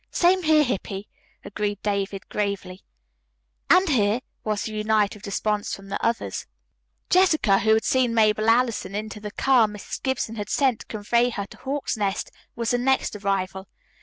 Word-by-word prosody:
"Same 370 Hz, +2 st, +3 dB
here, 310 Hz, -2 st, +4 dB
Hippy," 200 Hz, -5 st, -3 dB, 0.4 s
agreed 205 Hz, -1 st, -3 dB
David 200 Hz, -1 st, -2 dB
gravely. 200 Hz, -2 st, -3 dB, 0.9 s
"And 370 Hz, +3 st, +6 dB
here," 230 Hz, -5 st, +2 dB, 0.2 s
was 215 Hz, -1 st, -1 dB
the 220 Hz, -, -5 dB
united 215 Hz, -1 st, 0 dB
response 210 Hz, +1 st, -1 dB
from 195 Hz, 0 st, -13 dB
the 200 Hz, -, -4 dB
others. 230 Hz, 0 st, -1 dB, 0.6 s
Jessica, 310 Hz, -, +4 dB
who 220 Hz, +1 st, +4 dB
had 220 Hz, -, +1 dB
seen 250 Hz, -3 st, +2 dB
Mabel 215 Hz, 0 st, +3 dB
Allison 230 Hz, -5 st, +1 dB
into 215 Hz, 0 st, -5 dB
the 210 Hz, 0 st, -6 dB
car 240 Hz, +1 st, +3 dB
Mrs. 210 Hz, -1 st, -7 dB
Gibson 250 Hz, -4 st, -2 dB
had 205 Hz, -1 st, -5 dB
sent 260 Hz, -5 st, +2 dB
to -, -, -11 dB
convey 235 Hz, +3 st, +1 dB
her 200 Hz, -4 st, -4 dB
to -, -, -15 dB
Hawk's 275 Hz, -2 st, -3 dB
Nest, 200 Hz, -2 st, -2 dB, 0.2 s
was 235 Hz, -1 st, -1 dB
the 245 Hz, -, +1 dB
next 265 Hz, -2 st, +1 dB
arrival. 195 Hz, -1 st, -2 dB
215 Hz, 165 wpm, -24 LUFS, 205-245 Hz, 0.9 s, And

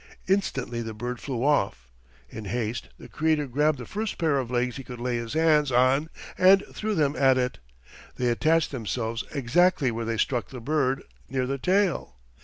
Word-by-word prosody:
Instantly 135 Hz, -11 st, 0 dB
the 110 Hz, -1 st, -6 dB
bird 120 Hz, +2 st, -4 dB
flew 130 Hz, -4 st, -3 dB
off. 100 Hz, -, +1 dB, 0.4 s
In 110 Hz, -, -8 dB
haste 115 Hz, +3 st, -3 dB
the -, -, -12 dB
Creator 155 Hz, -1 st, +1 dB
grabbed 145 Hz, +3 st, +1 dB
the 125 Hz, -, -7 dB
first 215 Hz, -, -4 dB
pair 155 Hz, -5 st, +2 dB
of 125 Hz, -3 st, -4 dB
legs 125 Hz, 0 st, -1 dB
he 135 Hz, -, -7 dB
could 125 Hz, -1 st, -9 dB
lay 120 Hz, 0 st, -1 dB
his 115 Hz, 0 st, -5 dB
hands 155 Hz, -3 st, +3 dB
on 130 Hz, +5 st, +3 dB, 0.3 s
and 190 Hz, +2 st, +6 dB
threw 215 Hz, 0 st, -2 dB
them 145 Hz, -2 st, +1 dB
at 135 Hz, -1 st, +4 dB
it. 125 Hz, -1 st, -1 dB, 0.6 s
They 125 Hz, -1 st, 0 dB
attached 155 Hz, +6 st, +2 dB
themselves 115 Hz, -2 st, -3 dB
exactly 145 Hz, +1 st, +2 dB
where 115 Hz, 0 st, -3 dB
they 115 Hz, 0 st, -2 dB
struck 120 Hz, -3 st, 0 dB
the 130 Hz, -, -8 dB
bird, 135 Hz, +1 st, 0 dB, 0.3 s
near 130 Hz, -1 st, -1 dB
the 135 Hz, +1 st, -3 dB
tail. 185 Hz, -, +1 dB
130 Hz, 185 wpm, -26 LUFS, 120-155 Hz, 0.6 s, and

